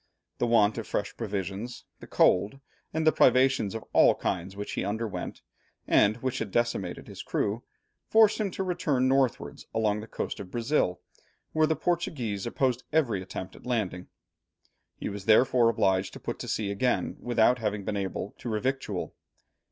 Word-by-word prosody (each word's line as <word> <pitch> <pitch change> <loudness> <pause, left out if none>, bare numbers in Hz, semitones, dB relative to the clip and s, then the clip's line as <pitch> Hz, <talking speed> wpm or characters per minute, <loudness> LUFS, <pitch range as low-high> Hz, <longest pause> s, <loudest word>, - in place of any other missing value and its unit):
The 120 - +1
want 115 -1 +3
of 110 - -6
fresh 100 - -2
provisions, 100 +2 -4
the - - -11
cold, 100 +9 +3 0.3
and 160 0 -1
the 155 - +7
privations 130 -6 +3
of 110 - -6
all - - +6
kinds 95 +2 -3
which 105 - -5
he - - -2
underwent, 105 +2 -4 0.4
and 105 +2 +4
which 130 0 -1
had 110 - -3
decimated 120 +3 -1
his - - -8
crew, 105 +4 -1 0.5
forced 220 -1 +5
him 210 -2 0
to 190 - -3
return 155 -8 +1
northwards 135 -2 0
along 105 -2 +1
the 110 - -8
coast - - -4
of 100 -2 -7
Brazil, 120 -6 0 0.5
where 155 0 +3
the 160 - +1
Portuguese 130 - -2
opposed 125 0 0
every 120 -11 +1
attempt 95 0 -7
at - - -13
landing. 100 -7 -2 0.9
He - - -4
was 100 -1 -6
therefore 120 +1 +5
obliged 95 -4 +1
to - - -9
put - - -5
to - - -6
sea 105 -2 -1
again 125 +5 0
without 120 +1 +3
having 105 -3 -2
been 105 - -2
able 100 0 -3
to 120 - -5
revictual. 110 -3 -2
115 Hz, 165 wpm, -28 LUFS, 100-130 Hz, 0.9 s, the